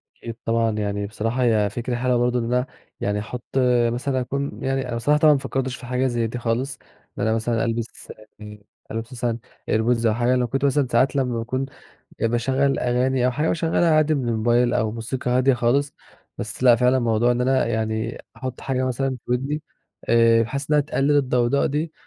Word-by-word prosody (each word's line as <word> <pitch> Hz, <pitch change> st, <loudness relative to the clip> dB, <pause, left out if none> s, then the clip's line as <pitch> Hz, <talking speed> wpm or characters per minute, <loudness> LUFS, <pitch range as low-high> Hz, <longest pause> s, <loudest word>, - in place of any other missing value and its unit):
أكيد 115 Hz, -1 st, -8 dB
طبعًا 115 Hz, 0 st, +1 dB
يعني 100 Hz, -1 st, -2 dB
بصراحة 115 Hz, +4 st, -2 dB
هي 110 Hz, -4 st, +3 dB
فكرة 120 Hz, +2 st, -3 dB
حلوة 125 Hz, 0 st, +1 dB
برضه 120 Hz, +1 st, +1 dB
إن 115 Hz, -, -2 dB
أنا 125 Hz, +2 st, +1 dB, 0.3 s
يعني 105 Hz, +1 st, -1 dB
أحط 120 Hz, +4 st, -7 dB, 0.5 s
مثلًا 130 Hz, +2 st, -1 dB
أكون 140 Hz, +3 st, -4 dB
يعني 135 Hz, -1 st, -1 dB
أنا 120 Hz, -, -3 dB
بصراحة 145 Hz, +6 st, +2 dB
طبعًا 150 Hz, -1 st, +6 dB
ما 140 Hz, -, +1 dB
فكرتش 130 Hz, -1 st, -3 dB
في 125 Hz, -, -11 dB
حاجة 125 Hz, +1 st, 0 dB
زي 120 Hz, -2 st, 0 dB
دي 120 Hz, +2 st, -5 dB
خالص، 125 Hz, +3 st, -2 dB, 0.4 s
إن -, -, -2 dB
أنا 110 Hz, 0 st, +2 dB
مثلًا 115 Hz, 0 st, 0 dB
ألبس 115 Hz, 0 st, -4 dB, 0.3 s
يعني 105 Hz, -1 st, -11 dB, 0.3 s
ألبس 115 Hz, +3 st, -5 dB
مثلًا 120 Hz, -1 st, -2 dB, 0.3 s
airpods 115 Hz, +1 st, +1 dB
أو 110 Hz, -, +3 dB
حاجة. 120 Hz, +2 st, +1 dB
لو 125 Hz, -1 st, +1 dB
كنت 135 Hz, +4 st, -1 dB
مثلًا 140 Hz, -1 st, +2 dB
ساعات 130 Hz, +4 st, +3 dB
لمّا 125 Hz, -4 st, 0 dB
باكون 130 Hz, +4 st, -2 dB, 0.6 s
باشغّل 130 Hz, +4 st, +1 dB
أغاني 125 Hz, +1 st, +1 dB
أو -, -, +3 dB
حاجة 150 Hz, +5 st, -1 dB
باشغّلها 165 Hz, 0 st, +2 dB
عادي 155 Hz, 0 st, +3 dB
من 130 Hz, -5 st, -1 dB
الموبايل 120 Hz, +2 st, +2 dB
أو 110 Hz, -2 st, +1 dB
موسيقى 125 Hz, +2 st, -4 dB
هادية 130 Hz, +2 st, +3 dB
خالص، 135 Hz, +4 st, +1 dB, 0.5 s
بس -, -, -5 dB
لأ 120 Hz, -2 st, +7 dB
فعلًا 125 Hz, +2 st, +3 dB
الموضوع 120 Hz, -1 st, +2 dB
إن 120 Hz, -, -2 dB
أنا 130 Hz, 0 st, +2 dB
يعني 110 Hz, 0 st, -2 dB
أحُط 130 Hz, +1 st, -6 dB
حاجة 130 Hz, -1 st, -1 dB
مثلًا 130 Hz, +1 st, -1 dB
في -, -, -8 dB
ودني 140 Hz, +5 st, -1 dB, 0.5 s
آآ 115 Hz, 0 st, +5 dB
بحيث 140 Hz, +6 st, -4 dB
إنها 150 Hz, -1 st, +5 dB
تقلّل 145 Hz, 0 st, +1 dB
الضوضاء 125 Hz, -1 st, +2 dB
دي، 155 Hz, +3 st, -2 dB
125 Hz, 195 wpm, -23 LUFS, 115-135 Hz, 0.6 s, لأ